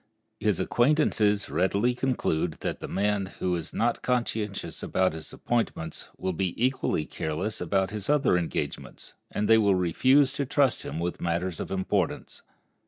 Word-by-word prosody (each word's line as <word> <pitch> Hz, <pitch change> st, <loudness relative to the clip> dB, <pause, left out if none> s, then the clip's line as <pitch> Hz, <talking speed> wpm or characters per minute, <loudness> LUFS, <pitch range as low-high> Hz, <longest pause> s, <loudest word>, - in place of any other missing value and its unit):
His -, -, +1 dB
acquaintances 120 Hz, -6 st, +2 dB
readily 100 Hz, +6 st, +1 dB
conclude 120 Hz, -, 0 dB
that -, -, -3 dB
the -, -, -6 dB
man 100 Hz, -1 st, 0 dB
who 90 Hz, -1 st, 0 dB
is 85 Hz, -2 st, -4 dB
not 120 Hz, +1 st, 0 dB
conscientious 115 Hz, -5 st, -2 dB
about 95 Hz, -3 st, +1 dB
his 80 Hz, 0 st, -7 dB
appointments 110 Hz, -9 st, -2 dB
will 95 Hz, 0 st, -2 dB
be 90 Hz, +1 st, -1 dB
equally 125 Hz, -10 st, 0 dB
careless 80 Hz, +8 st, -3 dB
about 95 Hz, +2 st, +1 dB
his 105 Hz, -2 st, -5 dB
other 145 Hz, -10 st, +3 dB
engagements, 85 Hz, -2 st, -4 dB, 0.2 s
and 105 Hz, -, -1 dB
they 110 Hz, 0 st, +6 dB
will 100 Hz, -3 st, +4 dB
refuse 130 Hz, -, +3 dB
to 140 Hz, -, -1 dB
trust 140 Hz, -3 st, +2 dB
him 75 Hz, -, -5 dB
with 85 Hz, +1 st, -3 dB
matters 85 Hz, 0 st, -1 dB
of -, -, -4 dB
importance. 95 Hz, -1 st, -2 dB
100 Hz, 155 wpm, -27 LUFS, 90-120 Hz, 0.2 s, they